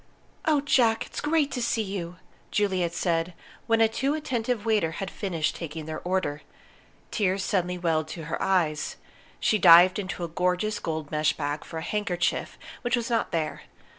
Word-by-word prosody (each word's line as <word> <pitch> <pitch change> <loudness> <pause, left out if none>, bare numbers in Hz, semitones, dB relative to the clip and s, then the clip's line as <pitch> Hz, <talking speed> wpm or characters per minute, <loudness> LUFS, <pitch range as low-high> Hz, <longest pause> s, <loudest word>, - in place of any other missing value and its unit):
"Oh, 305 -3 +3
Jack, 240 -5 +3
it's - - -6
great 300 -1 +1
to 250 - -3
see 230 -1 +1
you!" 185 -4 -5 0.3
Juliet 190 -4 +1
said, 170 0 0 0.3
when 225 -1 +3
a 225 - +7
too 270 +6 -1
attentive 245 -6 -2
waiter 210 -8 +2
had 195 +1 -5
finished 170 -6 -2
taking 160 -2 -6
their 160 0 -5
order. 175 -5 -1 0.7
Tears 195 -2 +1
suddenly 180 -2 0
welled 160 -3 0
to 165 +1 -7
her 155 - -4
eyes. 165 -5 +1 0.4
She 215 - +2
dived 180 +2 +8
into 185 -3 -4
a - - -1
gorgeous 180 +5 0
gold 160 -2 -4
mesh 150 0 +2
bag 145 0 -3
for 165 - -8
a 160 - -4
handkerchief, 180 -4 -1 0.2
which 245 0 +1
was 240 0 -3
not 230 - +1
there. 160 -2 -2
185 Hz, 170 wpm, -26 LUFS, 165-225 Hz, 0.7 s, dived